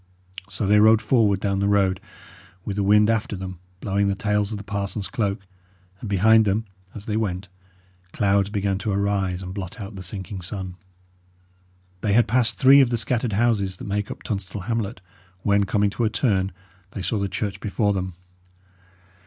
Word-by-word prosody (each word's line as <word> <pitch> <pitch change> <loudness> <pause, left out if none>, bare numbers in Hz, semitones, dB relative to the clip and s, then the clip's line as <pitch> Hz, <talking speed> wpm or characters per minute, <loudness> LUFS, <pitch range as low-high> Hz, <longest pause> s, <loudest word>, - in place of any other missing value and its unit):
So 100 +1 -3
they 105 +2 +5
rode 110 +1 +6
forward 110 -6 +2
down 100 -1 -1
the 100 - +1
road, 100 -2 +2 0.6
with 100 - -3
the 100 - 0
wind 105 +2 +5
after 110 -2 0
them, 95 -2 -7 0.2
blowing 100 0 +1
the 100 - +1
tails 105 -1 0
of 110 - -3
the 100 - -8
parson's 100 -1 -3
cloak; 100 -7 -2 0.5
and 110 - -6
behind 110 +3 +5
them, 105 +2 0 0.3
as 105 - -8
they 105 - -2
went, 95 -4 -2 0.6
clouds 100 -1 +2
began 100 -2 -1
to 105 - -2
arise 100 -2 0
and 90 0 -6
blot 95 -3 -6
out 100 0 -7
the 95 - -7
sinking 95 +1 -6
sun. 95 +1 -5 1.3
They 105 -2 +1
had 120 +2 +4
passed 120 -1 +1
three 140 +1 +7
of 130 - +3
the 120 - 0
scattered 120 -1 -1
houses 100 -4 +1
that - - -8
make 100 0 -2
up - - -8
Tunstall 100 -2 -4
hamlet, 110 -3 -3 0.4
when, 100 0 +3
coming 100 0 +1
to 120 - -2
a - - +2
turn, 100 -5 +1 0.4
they 100 - -5
saw 110 - -1
the 100 0 -1
church 100 +1 -3
before 105 0 0
them. 95 -2 -3
100 Hz, 185 wpm, -23 LUFS, 95-110 Hz, 1.3 s, three